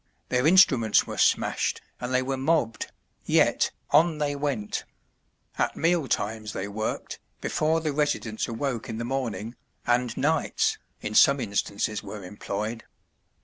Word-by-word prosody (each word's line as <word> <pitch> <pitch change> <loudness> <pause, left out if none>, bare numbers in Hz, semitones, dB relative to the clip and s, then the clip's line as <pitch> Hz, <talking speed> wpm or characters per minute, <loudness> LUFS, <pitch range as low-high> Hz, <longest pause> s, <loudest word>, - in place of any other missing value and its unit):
Their 125 +3 +2
instruments 135 - +5
were - - -6
smashed - - +2 0.2
and 125 +1 -4
they 130 0 +2
were 135 +1 -2
mobbed, 130 -4 0 0.3
yet, - - +3 0.2
on 160 0 +4
they 145 -1 -1
went, 140 -8 -2 0.8
at - - +1
meal 165 -3 +2
times 110 -1 -2
they 95 - -3
worked, 110 +2 -4 0.2
before 160 +1 +1
the 155 -2 -1
residents 140 -7 -1
awoke 120 +1 -3
in 110 - -4
the 120 - -3
morning, 120 -4 -3 0.3
and 120 -1 +1
nights, 155 +2 +1 0.2
in 105 - -4
some 140 +5 +6
instances 105 -1 -1
were 105 -2 -8
employed. 105 +4 -4
125 Hz, 140 wpm, -26 LUFS, 110-145 Hz, 0.8 s, some